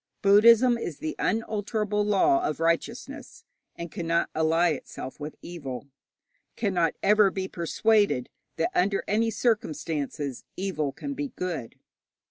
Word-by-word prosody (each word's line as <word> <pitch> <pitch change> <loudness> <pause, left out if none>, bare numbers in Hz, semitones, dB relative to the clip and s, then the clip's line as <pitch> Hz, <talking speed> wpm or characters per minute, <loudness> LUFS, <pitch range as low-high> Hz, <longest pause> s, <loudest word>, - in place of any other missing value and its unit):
Buddhism 230 +4 +6
is 165 -9 -5
the 155 - -4
unalterable 210 -1 -1
law 340 - +3
of 360 - -2
righteousness, 230 - -2 0.3
and 170 -1 -7
cannot 170 0 -1
ally 165 +2 +3
itself 130 -2 -7
with 150 +1 -6
evil, 140 -6 -7 0.7
cannot 180 -7 0
ever 210 0 +5
be 190 0 -4
persuaded 200 - +1 0.3
that 165 - 0
under 195 +2 +1
any 225 +2 +2
circumstances 155 - -2
evil 180 -7 -2
can 280 - -6
be 285 +1 -3
good. 165 -10 -4
190 Hz, 120 wpm, -27 LUFS, 160-215 Hz, 0.7 s, Buddhism